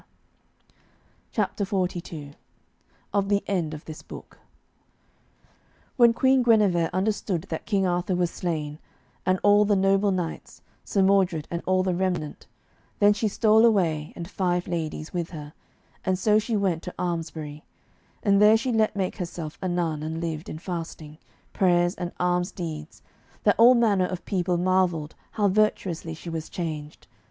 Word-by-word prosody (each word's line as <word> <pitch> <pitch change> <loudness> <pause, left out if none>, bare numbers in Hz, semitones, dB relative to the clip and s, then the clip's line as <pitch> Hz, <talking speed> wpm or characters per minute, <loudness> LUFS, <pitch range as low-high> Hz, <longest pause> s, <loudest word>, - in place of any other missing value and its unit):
_" - - -32 0.6
CHAPTER 205 - -1
XLII 175 -6 -3 0.8
OF 200 -1 +1
THE 200 0 +2
END 170 -6 -1
OF 150 - -11
THIS 155 -1 -8
BOOK - - -12 1.6
When 240 -3 +6
Queen 260 +2 +3
Guenever 205 -8 +3
understood 190 -2 -1
that 160 - -5
King 200 -3 +1
Arthur 180 +1 0
was 175 -1 0
slain, 155 -4 -3 0.5
and 185 0 +3
all 205 0 +6
the 205 0 +2
noble 195 +1 +3
knights, 180 -4 -4 0.2
Sir 195 - +1
Mordred 190 -5 +2
and 170 0 -2
all 185 0 +3
the 185 -1 0
remnant, 175 -4 -2 0.5
then 205 0 +5
she 215 +1 -1
stole 220 +1 +4
away, 170 -9 +2
and 170 - -6
five 180 -2 -1
ladies 160 -2 -4
with 175 -2 -2
her, 150 -3 -9 0.5
and 185 0 +1
so 210 +3 +3
she 220 0 -1
went 185 -5 0
to 180 - -8
Almesbury, 160 -4 -4 0.6
and 200 -1 +4
there 215 +1 +7
she 245 +3 -2
let 220 -2 +2
make 190 -2 -2
herself 170 -4 -6
a 190 - -1
nun, 170 -4 -1
and 160 +1 -4
lived 160 -2 -4
in - - -6
fasting, 165 -3 -6 0.3
prayers, 175 -2 +3
and 175 -1 -5
alms 180 +1 +1
deeds, 160 -4 -7 0.4
that - - +5
all 245 +2 +8
manner 205 -6 +3
of 185 -1 -6
people 180 -2 0
marvelled 175 -4 +1 0.2
how 210 -2 +2
virtuously 185 -5 0
she 170 +2 -8
was 160 -1 -5
changed. 155 -4 -5
180 Hz, 155 wpm, -25 LUFS, 165-200 Hz, 1.6 s, all